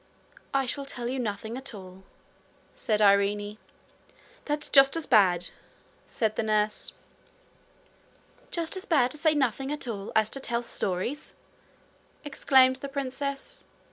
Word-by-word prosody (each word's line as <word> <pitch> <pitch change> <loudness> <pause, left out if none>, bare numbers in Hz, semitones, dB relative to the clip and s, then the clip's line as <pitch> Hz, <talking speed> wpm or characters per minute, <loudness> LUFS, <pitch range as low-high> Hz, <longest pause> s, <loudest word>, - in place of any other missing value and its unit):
'I 270 -1 +1
shall 275 +3 -3
tell 240 -3 -5
you 260 +2 -2
nothing 220 0 -4
at 265 -3 -5
all,' 185 -1 -11 0.7
said 215 -1 0
Irene. 205 +1 +2 0.9
'That's 295 0 -3
just 275 +2 +6
as 325 - -2
bad,' 185 -7 +3 0.6
said 220 -2 -1
the - - 0
nurse. 215 -1 0 1.6
'Just 335 +2 -1
as 375 - -5
bad 265 -7 +3
to 300 - -4
say 315 0 +3
nothing 270 0 0
at 295 -3 -3
all 205 -3 -5
as 220 -1 +3
to 275 - -1
tell 240 -2 -1
stories?' 230 +6 -3 0.9
exclaimed 260 -2 +4
the 280 +1 -7
princess. 275 0 -3
250 Hz, 135 wpm, -27 LUFS, 210-275 Hz, 1.6 s, just